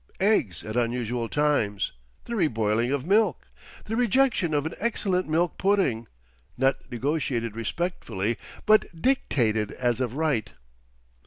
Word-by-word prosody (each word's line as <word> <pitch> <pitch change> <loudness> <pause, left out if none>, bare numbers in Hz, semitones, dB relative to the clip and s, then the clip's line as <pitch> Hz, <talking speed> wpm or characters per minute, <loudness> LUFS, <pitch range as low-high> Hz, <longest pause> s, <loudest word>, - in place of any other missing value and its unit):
Eggs 170 - +2
at 110 +1 -6
unusual 120 -1 -1
times, 145 -9 +1 0.3
the 235 - -5
reboiling 115 - +1
of 140 -1 -1
milk, 210 +5 +2 0.4
the 220 - -3
rejection 245 -6 +2
of 145 -1 +1
an 160 - -3
excellent 190 -6 0
milk 165 +1 +1
pudding—not 115 - -1
negotiated 120 -3 -1
respectfully 115 - -2 0.3
but 215 -6 +3
dictated 115 - +1
as 120 -2 0
of 125 -1 -2
right. 150 -8 0
135 Hz, 115 wpm, -26 LUFS, 115-180 Hz, 0.4 s, but